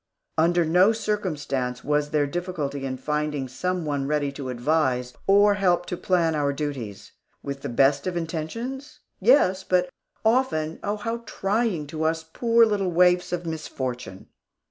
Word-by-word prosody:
Under 170 +1 +3
no 180 +7 +5
circumstance 150 - -2
was 150 0 +1
there 150 -1 +2
difficulty 145 -4 -3
in 130 0 -4
finding 150 0 -2
some 180 +7 -2
one 140 -2 -1
ready 145 -1 0
to 135 -1 -6
advise 125 -1 0
or 205 +1 +6
help 180 -3 +2
to 180 - -3
plan 170 -2 +1
our 145 -2 +1
duties. 135 -9 -5 0.3
With 140 0 -5
the - - -4
best 140 +5 +3
of 180 -1 -2
intentions? 230 - -5 0.2
Yes, 190 -4 +4
but 180 -1 +1 0.3
often, 220 -10 +1
oh, 205 +1 -1
how 230 +2 -3
trying 200 -5 0
to 155 +2 -6
us, 160 0 0
poor 230 +8 +3
little 205 -4 0
waifs 180 +1 +3
of 175 -1 -3
misfortune! 130 - -5
160 Hz, 150 wpm, -25 LUFS, 140-185 Hz, 0.3 s, or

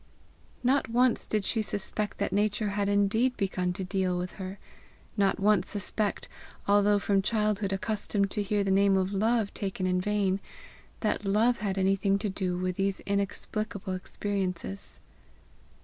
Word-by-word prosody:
Not 260 -1 +2
once 245 +1 +2
did 210 -2 0
she 225 - +1
suspect 205 0 -3
that 200 - -1
Nature 210 +1 +1
had 200 0 0
indeed 215 +5 +2
begun 185 -3 0
to 190 +1 -4
deal 185 -1 0
with 180 0 -4
her; 190 +1 -5 0.6
not 200 -2 +2
once 200 -2 +3
suspect, 205 0 0 0.4
although 205 0 +4
from 200 -1 +2
childhood 210 -1 0
accustomed 200 0 0
to 210 - -1
hear 205 0 0
the 195 - 0
name 195 0 +4
of 190 +1 0
Love 220 +1 +1
taken 195 -2 -3
in 180 0 +1
vain, 200 -1 +1 0.6
that 210 -2 0
love 220 +5 +2
had 195 -2 -2
anything 195 +1 +2
to 210 +1 -2
do 185 -2 -2
with 185 0 -2
these 195 0 0
inexplicable 200 0 -2
experiences. 195 0 -3
200 Hz, 150 wpm, -29 LUFS, 190-210 Hz, 0.6 s, although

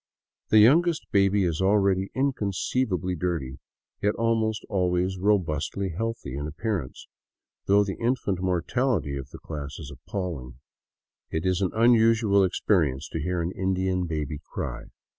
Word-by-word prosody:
The 110 - +5
youngest 155 +10 +5
baby 100 0 +3
is 85 -1 -1
already 95 -1 +2
inconceivably 105 -6 -1
dirty, 80 -7 -3 0.4
yet 105 +1 +1
almost 110 -2 0
al 95 -3 +1
ways 90 +1 0
robustly 95 -1 0
healthly 110 - -4
in 70 +2 -4
appearance, 85 - -4 0.6
though 100 +1 +5
the 100 -1 -5
infant 115 -6 0
mortality 95 - 0
of 70 -1 -6
the - - -10
class 75 -2 -7
is 75 -5 -8
appalling. 70 -2 -5 0.7
It 80 +2 -3
is 95 0 +1
an 95 - +2
unusual 115 -3 +4
experience 80 -7 +1
to 80 - -4
hear 90 +2 -1
an 85 - -2
Indian 95 -1 -1
baby 75 -2 -3
cry. - - -5
95 Hz, 140 wpm, -26 LUFS, 80-105 Hz, 0.7 s, The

